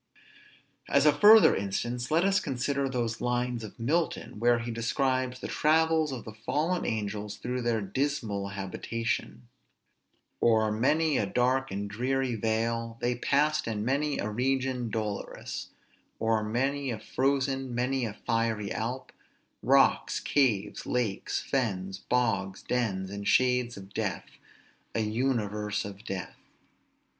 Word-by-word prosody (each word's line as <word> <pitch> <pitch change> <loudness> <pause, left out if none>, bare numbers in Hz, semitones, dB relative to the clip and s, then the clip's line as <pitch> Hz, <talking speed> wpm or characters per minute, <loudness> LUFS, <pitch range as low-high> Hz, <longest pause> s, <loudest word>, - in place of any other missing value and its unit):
As 140 +1 +4
a 150 - +7
further 215 +1 +8
instance, 120 +5 -2
let 165 +3 +3
us 195 0 +3
consider 140 -1 -1
those 120 -3 -2
lines 125 -1 -1
of 110 - -10
Milton, 150 -3 -1
where 120 +1 +4
he 120 0 -4
describes 130 +2 0
the - - -5
travels 160 0 +2
of 125 -4 -6
the 110 - -8
fallen 155 +11 -1
angels 105 -2 -3
through 125 +1 -3
their 120 -2 0
dismal 105 -2 -2
habitation: 100 - -4 0.9
"O'er 110 -2 +4
many 145 +7 +2
a 105 - 0
dark 130 +4 +1
and 100 +1 -3
dreary 125 +4 -1
vale 115 +1 -1
They 120 +1 +1
passed, 145 +4 +1
and 105 -2 -2
many 140 +3 0
a - - -2
region 125 +1 0
dolorous; 105 -2 -4 0.5
O'er 110 -1 +1
many 135 +5 -1
a 115 - -2
frozen, 135 +2 -1
many 130 +2 0
a 110 -3 -3
fiery 115 -2 -1
Alp; 125 +4 -3 0.5
Rocks, - - +3
caves, 120 -9 +1
lakes, 115 -5 -1
fens, 95 -8 -1
bogs, 100 -6 0
dens, 100 -6 -1
and 100 0 -5
shades 125 -2 +2
of 95 0 -11
death, 105 -6 -2 0.7
A 115 - +2
universe 105 -3 -1
of 100 +1 -9
death." 95 -4 -5
120 Hz, 130 wpm, -29 LUFS, 105-135 Hz, 0.9 s, further